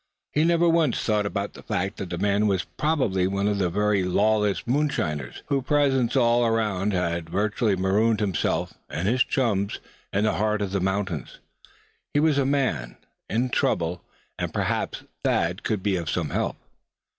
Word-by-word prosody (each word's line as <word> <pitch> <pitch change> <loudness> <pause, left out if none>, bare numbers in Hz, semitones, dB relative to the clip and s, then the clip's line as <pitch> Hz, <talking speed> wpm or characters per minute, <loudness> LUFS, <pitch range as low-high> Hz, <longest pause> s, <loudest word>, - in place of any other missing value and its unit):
He 150 - +2
never 170 +1 +3
once 165 -6 +3
thought 105 -2 +1
about 100 0 -3
the - - -11
fact 95 +3 -2
that 95 - -5
the 85 - -3
man 100 +3 +2
was 95 -3 +1
very - - -27
probably 130 - +1
one 100 +1 0
of 105 -1 0
those 90 -3 +1
very 105 0 +2
lawless 105 +2 +1
moonshiners, 120 - -1
whose 140 -2 0
presence 135 -3 +2
all 120 -2 +4
around 105 -4 +1
had 85 -3 -1
virtually 105 +2 +1
marooned 100 +4 +2
himself 100 -6 0 0.2
and 95 +10 0
chums 105 -7 0 0.3
in 100 - +1
the 110 - +2
heart 105 0 0
of 95 - -3
the 100 -1 0
mountains. 95 -4 -2 0.8
He - - +5
was 150 -2 +3
a 135 - +2
man, 135 - 0 0.3
and 115 +4 +1
in 130 - -2
trouble; 85 -4 0 0.4
and - - -2
perhaps - - -2 0.2
Thad 85 +4 +1
could 105 -4 -2
be 100 -3 +1
of 85 -3 -3
some - - -1
help! - - -1
105 Hz, 175 wpm, -25 LUFS, 95-120 Hz, 0.8 s, He